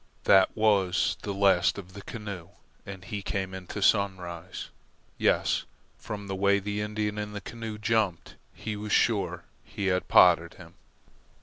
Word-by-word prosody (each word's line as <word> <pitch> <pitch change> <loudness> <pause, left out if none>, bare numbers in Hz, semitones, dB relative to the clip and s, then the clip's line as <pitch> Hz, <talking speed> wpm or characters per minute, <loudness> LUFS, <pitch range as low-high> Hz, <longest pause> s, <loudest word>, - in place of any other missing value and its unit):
That 95 -1 +6
was 100 -4 +2
the 105 - -4
last 95 -3 +3
of 95 -2 -9
the 100 - -9
canoe, 100 -5 -7 0.4
and 95 -2 -8
he 105 -1 -4
came 95 -1 -3
on - - -7
into 95 +2 -5
Sunrise. 95 -4 0 0.5
Yes, - - +2 0.3
from 105 -1 -6
the 95 - -4
way 100 +1 +3
the 105 +1 -3
Indian 105 0 -2
in 105 0 -5
the 105 - -4
canoe 115 -1 -7
jumped, 105 -5 0 0.2
he 110 -1 -5
was 105 0 -6
sure - - +1 0.2
he 100 - -5
had 90 - -2
potted - - +5
him. - - -14
100 Hz, 160 wpm, -28 LUFS, 95-105 Hz, 0.5 s, That